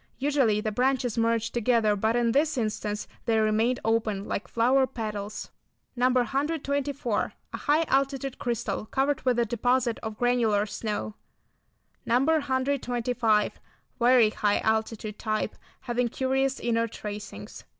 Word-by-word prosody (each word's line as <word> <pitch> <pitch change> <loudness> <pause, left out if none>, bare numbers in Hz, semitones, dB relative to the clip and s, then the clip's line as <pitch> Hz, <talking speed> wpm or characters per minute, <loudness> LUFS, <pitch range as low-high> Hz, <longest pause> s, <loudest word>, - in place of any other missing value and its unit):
Usually 265 -7 +2
the 215 - -2
branches 250 0 +1
merge 230 0 +1
together 230 -3 +2
but 220 +3 +1
in 240 -1 +2
this 295 +3 +2
instance 210 -2 -2 0.2
they 225 -1 +3
remained 220 +3 +2
open 220 -3 0
like 200 - -3
flower 260 +3 +3
petals. 215 -4 -5 0.4
No. 250 +1 +3
124. 275 0 -1 0.2
A - - -2
high 300 +3 +2
altitude 275 -2 0
crystal 225 -3 -2
covered 275 +3 0
with 250 -2 +1
a 235 - +3
deposit 240 +1 +1
of 220 -1 -6
granular 230 -4 +2
snow. 215 0 -4 0.9
No. 235 - +2
125. 255 -6 +1 0.4
Very 240 -2 +5
high 205 -1 +1
altitude 220 -1 -1
type, 215 0 -1 0.3
having 245 -1 0
curious 265 +2 0
inner 230 -1 +1
tracings. 210 -1 -8
235 Hz, 130 wpm, -27 LUFS, 215-260 Hz, 0.9 s, Very